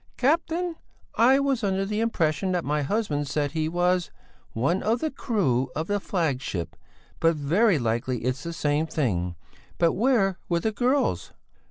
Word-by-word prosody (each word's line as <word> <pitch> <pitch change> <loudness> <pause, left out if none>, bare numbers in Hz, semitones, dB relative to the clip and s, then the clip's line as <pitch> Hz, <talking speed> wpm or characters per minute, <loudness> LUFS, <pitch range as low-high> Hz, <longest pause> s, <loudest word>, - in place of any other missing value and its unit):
"Captain! 330 +5 0 0.4
I 260 +4 +5
was 275 -4 0
under 195 -1 0
the 210 +2 -2
impression 185 -5 0
that 175 -2 -1
my 150 +1 0
husband 145 -3 -1
said 145 0 -1
he 155 0 -1
was 175 0 +1 0.4
one 155 +12 +1
of 225 +3 +1
the 315 +2 -2
crew 140 - 0
of 155 - -1
the 205 +3 0
flagship, 135 - -2 0.4
but 165 0 +3
very 170 +7 +3
likely 120 0 -1
it's 130 +2 -1
the 170 - -5
same 150 -1 0
thing. 90 - -1 0.4
But 170 -1 +3
where 210 -5 +2
were 170 -1 +2
the 220 - 0
girls?" 255 +6 0
175 Hz, 160 wpm, -26 LUFS, 145-225 Hz, 0.4 s, I